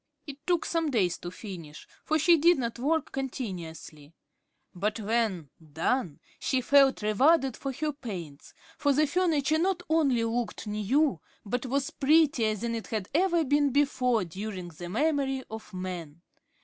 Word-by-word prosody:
It 285 Hz, -2 st, -8 dB
took 350 Hz, -3 st, +2 dB
some 330 Hz, -2 st, 0 dB
days 200 Hz, -10 st, +1 dB
to 175 Hz, -, -6 dB
finish, 175 Hz, -6 st, -9 dB, 0.2 s
for 310 Hz, -, +1 dB
she 335 Hz, +3 st, +5 dB
did 335 Hz, +3 st, +4 dB
not 235 Hz, -2 st, -3 dB
work 310 Hz, +4 st, 0 dB
continuously, 170 Hz, -, -6 dB, 0.6 s
but 210 Hz, +4 st, -2 dB
when 210 Hz, -, -1 dB
done 160 Hz, -, -2 dB, 0.2 s
she 260 Hz, -, 0 dB
felt 270 Hz, -2 st, +4 dB
rewarded 270 Hz, +6 st, +3 dB
for 275 Hz, -, -4 dB
her 300 Hz, +3 st, -2 dB
pains; 180 Hz, -, -8 dB, 0.2 s
for 285 Hz, -, +3 dB
the 305 Hz, +3 st, +3 dB
furniture 315 Hz, -2 st, +1 dB
not 360 Hz, 0 st, 0 dB
only 275 Hz, -8 st, +3 dB
looked 230 Hz, 0 st, -2 dB
new, 210 Hz, -, +1 dB, 0.3 s
but 245 Hz, +5 st, -2 dB
was 275 Hz, +2 st, -1 dB
prettier 280 Hz, -7 st, +3 dB
than 230 Hz, +3 st, -3 dB
it 225 Hz, -1 st, -4 dB
had 215 Hz, -5 st, -3 dB
ever 340 Hz, +1 st, +3 dB
been 290 Hz, +1 st, +3 dB
before 250 Hz, -5 st, +2 dB
during 185 Hz, +1 st, -6 dB
the 175 Hz, +1 st, -9 dB
memory 270 Hz, -, 0 dB
of 220 Hz, -1 st, -8 dB
man. 180 Hz, -4 st, -6 dB
245 Hz, 150 wpm, -28 LUFS, 195-290 Hz, 0.6 s, she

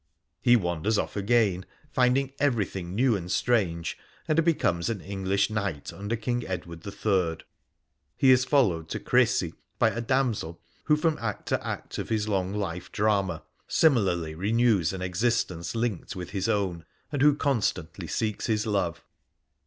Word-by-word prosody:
He 120 Hz, -, +6 dB
wanders 95 Hz, +1 st, 0 dB
off -, -, -2 dB
again, 100 Hz, -3 st, +2 dB, 0.3 s
finding 130 Hz, +1 st, +2 dB
everything 100 Hz, -9 st, -1 dB
new 125 Hz, 0 st, +3 dB
and 90 Hz, -2 st, -4 dB
strange, 90 Hz, -9 st, 0 dB, 0.3 s
and 165 Hz, +1 st, +3 dB
becomes 120 Hz, -, +1 dB
an 110 Hz, -3 st, -2 dB
English 100 Hz, +2 st, -1 dB
knight 100 Hz, -9 st, -3 dB
under 100 Hz, +4 st, -3 dB
King 120 Hz, +2 st, -2 dB
Edward 85 Hz, -3 st, -6 dB
III. 95 Hz, -5 st, 0 dB, 0.7 s
He 130 Hz, -, +6 dB
is 130 Hz, 0 st, +5 dB
followed 95 Hz, -, +2 dB
to -, -, -3 dB
Crecy -, -, +2 dB, 0.2 s
by -, -, +3 dB
a 115 Hz, -, -3 dB
damsel 115 Hz, -9 st, 0 dB, 0.3 s
who 150 Hz, -, +4 dB
from 155 Hz, 0 st, 0 dB
act 105 Hz, -3 st, -4 dB
to -, -, 0 dB
act -, -, -5 dB
of -, -, -4 dB
his 110 Hz, -1 st, 0 dB
long 95 Hz, -3 st, 0 dB
life 90 Hz, -4 st, -4 dB
drama 100 Hz, -6 st, 0 dB, 0.2 s
similarly 95 Hz, -, +2 dB
renews 105 Hz, 0 st, +2 dB
an 95 Hz, -1 st, -5 dB
existence 95 Hz, -2 st, -1 dB
linked 115 Hz, -6 st, -2 dB
with 90 Hz, -2 st, -6 dB
his 100 Hz, +1 st, -1 dB
own, 95 Hz, -6 st, 0 dB, 0.3 s
and 145 Hz, -3 st, -2 dB
who 145 Hz, 0 st, +6 dB
constantly 100 Hz, -, -1 dB
seeks 110 Hz, +4 st, -2 dB
his 110 Hz, -1 st, +1 dB
love. 95 Hz, -6 st, -1 dB
100 Hz, 155 wpm, -27 LUFS, 90-120 Hz, 0.7 s, He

